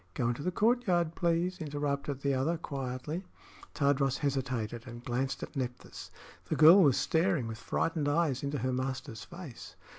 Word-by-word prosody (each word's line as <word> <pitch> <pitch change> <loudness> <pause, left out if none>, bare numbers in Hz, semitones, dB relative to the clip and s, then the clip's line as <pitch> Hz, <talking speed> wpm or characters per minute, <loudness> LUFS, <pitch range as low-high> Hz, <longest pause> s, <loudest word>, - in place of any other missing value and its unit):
"Go 120 -2 +1
into 120 +3 -2
the 180 - 0
courtyard, 190 -7 +2
please," 175 +2 0
interrupted 145 -2 -2
the 140 0 +1
other, 145 +6 +1
quietly. 140 +3 -4 0.5
Tadros 140 -2 +2
hesitated 125 -4 -2
and 120 0 -9
glanced 135 +3 -2
at - - -8
Nephthys. 125 -3 -5 0.4
The - - -1
girl 165 +5 +9
was 140 -7 +5
staring 165 -5 +1
with 115 -1 -6
frightened 155 +1 -1
eyes 145 -4 +1
into 145 0 -2
her 130 +1 -1
master's 130 -2 -3
face. 170 -8 -10
140 Hz, 155 wpm, -31 LUFS, 130-165 Hz, 0.5 s, girl